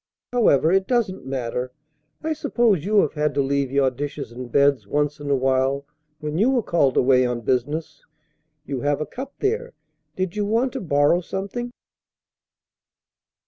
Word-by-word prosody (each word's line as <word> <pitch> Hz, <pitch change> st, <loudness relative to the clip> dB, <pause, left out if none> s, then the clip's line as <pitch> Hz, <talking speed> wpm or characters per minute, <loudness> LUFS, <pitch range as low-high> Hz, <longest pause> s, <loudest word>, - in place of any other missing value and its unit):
However, 165 Hz, -, +4 dB
it 190 Hz, 0 st, +2 dB
doesn't 220 Hz, -, -1 dB
matter. 125 Hz, -1 st, -3 dB, 0.5 s
I 320 Hz, 0 st, 0 dB
suppose 235 Hz, -, +1 dB
you 210 Hz, 0 st, +4 dB
have -, -, -1 dB
had 150 Hz, -2 st, -1 dB
to 140 Hz, -, +3 dB
leave 140 Hz, -1 st, 0 dB
your 135 Hz, -1 st, +3 dB
dishes 145 Hz, 0 st, -5 dB
and 120 Hz, 0 st, -8 dB
beds 140 Hz, 0 st, +3 dB
once 150 Hz, 0 st, 0 dB
in 145 Hz, -1 st, -6 dB
a 140 Hz, -, +3 dB
while 135 Hz, +1 st, +1 dB, 0.3 s
when 150 Hz, +2 st, -3 dB
you 225 Hz, +5 st, +4 dB
were 255 Hz, -4 st, +2 dB
called 145 Hz, -8 st, +2 dB
away 130 Hz, 0 st, +5 dB
on 120 Hz, -1 st, -1 dB
business. 130 Hz, +7 st, -2 dB, 0.6 s
You 135 Hz, -2 st, -3 dB
have 145 Hz, 0 st, +1 dB
a 155 Hz, -, -2 dB
cup 270 Hz, +2 st, -8 dB
there; 470 Hz, +4 st, -1 dB, 0.4 s
did 185 Hz, -1 st, -2 dB
you 210 Hz, -, 0 dB
want 230 Hz, +5 st, +1 dB
to -, -, -4 dB
borrow 145 Hz, 0 st, +3 dB
something?" 200 Hz, +7 st, -4 dB
150 Hz, 165 wpm, -23 LUFS, 135-205 Hz, 0.6 s, away